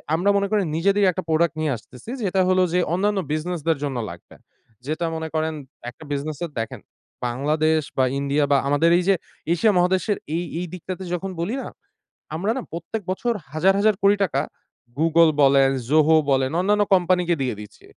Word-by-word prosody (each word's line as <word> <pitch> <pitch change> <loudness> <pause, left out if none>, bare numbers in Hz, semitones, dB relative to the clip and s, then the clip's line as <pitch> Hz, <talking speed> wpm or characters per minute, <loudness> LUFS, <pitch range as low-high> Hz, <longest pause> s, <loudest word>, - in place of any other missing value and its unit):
আমরা 185 +5 +1
মনে 200 - +1
করেন 205 -3 +2
নিজেদের 200 +4 +2
একটা 185 +2 -5
প্রোডাক্ট 160 0 +2
নিয়ে 155 -3 0
আসতেছি। 125 - -14
যেটা 190 -1 +1
হলো 185 0 +3
যে 180 - +3
অন্যান্য 200 +2 +1
বিজনেসদের 165 -1 -1
জন্য 140 -3 -2
লাগবে। 85 0 -12 0.5
যেটা 155 +3 -2
মনে 160 0 -4
করেন 160 0 0 0.4
একটা 145 - -14
বিজনেসের 150 +3 -3
দেখেন। 115 - -5 0.5
বাংলাদেশ 155 +5 +1 0.2
বা, 130 - +4 0.2
ইন্ডিয়া 140 +1 +1
বা, 140 - +6
আমাদের 145 +4 +3
এইযে 190 +2 +3 0.4
এশিয়া 210 +4 +3
মহাদেশের 185 +3 +2 0.2
এই 175 - -2 0.2
এই 180 - -3
দিকটাতে 185 +1 -6
যখন 190 +2 -3
বলি 210 +9 -2
না? - - -6 0.7
আমরা 195 +7 0
না - - -2
প্রত্যেক 175 +6 -5
বছর 235 +5 -1 0.2
হাজার 185 +5 +3
হাজার 215 -1 +3
কোটি 200 +1 +6
টাকা 140 -6 -1 0.6
Google 165 0 +5
বলেন, 135 0 +5 0.2
ZOHO 155 +1 +5
বলেন, 130 0 +2
অন্যান্য 205 +2 +3
কোম্পানিকে 180 -1 +2
দিয়ে 125 -5 -1
দিচ্ছি। 105 - -14
170 Hz, 170 wpm, -23 LUFS, 150-190 Hz, 0.7 s, বা